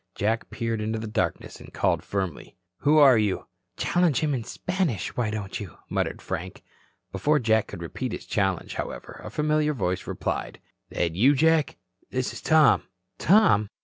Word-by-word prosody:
Jack 110 +3 -1
peered 115 -2 -2
into 110 +1 -2
the 110 - -5
darkness 110 +1 -2
and - - -13
called - - +1
firmly: 95 -6 -4 0.2
"Who 150 +2 +3
are 135 -6 +7
you?" 105 -3 0 0.3
"Challenge 175 -5 +2
him 150 -2 +1
in 125 -4 -2
Spanish, 180 - -2
why 120 -3 0
don't 105 0 -4
you?" 100 -7 -8
muttered - - -2
Frank. - - -5 0.5
Before 145 +11 +2
Jack 110 -4 +2
could 85 - -8
repeat 125 +9 -4
his - - -6
challenge, 95 -4 -1
however, - - -6
a - - -6
familiar 150 0 +1
voice 90 -6 -2
replied: - - -3 0.3
"That 85 -2 -1
you, 125 - +4
Jack? 160 +1 +2 0.3
This 130 0 -2
is - - -8
Tom." 155 -5 +5 0.4
"Tom? 165 - +4
115 Hz, 165 wpm, -26 LUFS, 105-150 Hz, 0.5 s, are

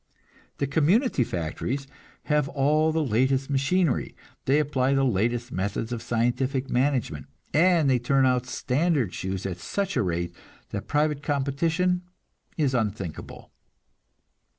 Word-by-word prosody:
The 140 - 0
community 160 - +2
factories 115 - -3 0.4
have 150 -2 +1
all 155 +3 +2
the 160 0 +1
latest 130 +3 +1
machinery; 140 +2 +1 0.3
they 135 +2 +3
apply 140 -3 +1
the 135 0 +3
latest 120 +2 0
methods 100 +4 -2
of 120 -2 -3
scientific 125 +4 0
management, 125 - 0 0.3
and 170 -1 +4
they 130 -2 +3
turn 135 +2 +2
out 125 -1 +1
standard 135 - 0
shoes 95 0 -4
at 90 -2 -4
such 200 - -2
a 130 - +2
rate 85 -2 -2 0.4
that - - -5
private 150 -1 +1
competition 160 +6 0 0.6
is 145 -5 +1
unthinkable. 105 -8 -4
135 Hz, 125 wpm, -26 LUFS, 120-150 Hz, 0.6 s, and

